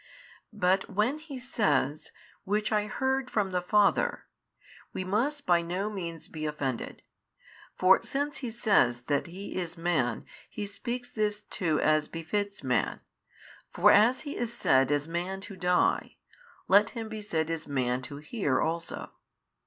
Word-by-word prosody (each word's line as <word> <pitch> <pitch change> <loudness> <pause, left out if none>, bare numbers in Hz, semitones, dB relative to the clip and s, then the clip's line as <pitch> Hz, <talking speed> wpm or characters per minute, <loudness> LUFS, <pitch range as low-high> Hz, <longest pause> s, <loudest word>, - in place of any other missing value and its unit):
But 190 -1 +2
when 225 +9 +1
He 310 -4 -8
says, 155 - 0 0.3
Which 210 +2 0
I 210 -1 +1
heard 265 +3 -1
from 205 -5 0
the 180 -1 0
Father, 205 +3 +2 0.7
we 185 - -3
must 255 +10 -1
by 175 -1 +4
no 185 +5 -2
means 170 -5 -6
be 155 -1 -4
offended. 135 -5 -4 0.7
For 185 +1 +5
since 285 +1 -2
He 260 -3 -4
says 200 - +2
that 140 +3 0
|640 - - -10
He 190 +4 -8
is 175 -1 -3
Man, 155 -9 0 0.2
He 210 - -5
speaks 240 +5 -5
this 210 -1 -1
too 160 -6 -1
as 155 -1 +3
befits 200 +4 -3
man: 125 -1 0 0.7
for - - +5
as 225 +5 +5
He 290 -1 -6
is 235 -1 -2
said 135 - +3
as 145 +1 +1
Man 175 +3 -3
to 200 0 -8
die, 180 -1 +1 0.5
let 205 +3 +6
Him 225 -1 -4
be 220 -1 -6
said 165 -6 -1
as 165 -1 -4
Man 130 -3 0
to 135 +2 -6
hear 150 - -1
also. 165 +1 -3
190 Hz, 155 wpm, -29 LUFS, 155-215 Hz, 0.7 s, let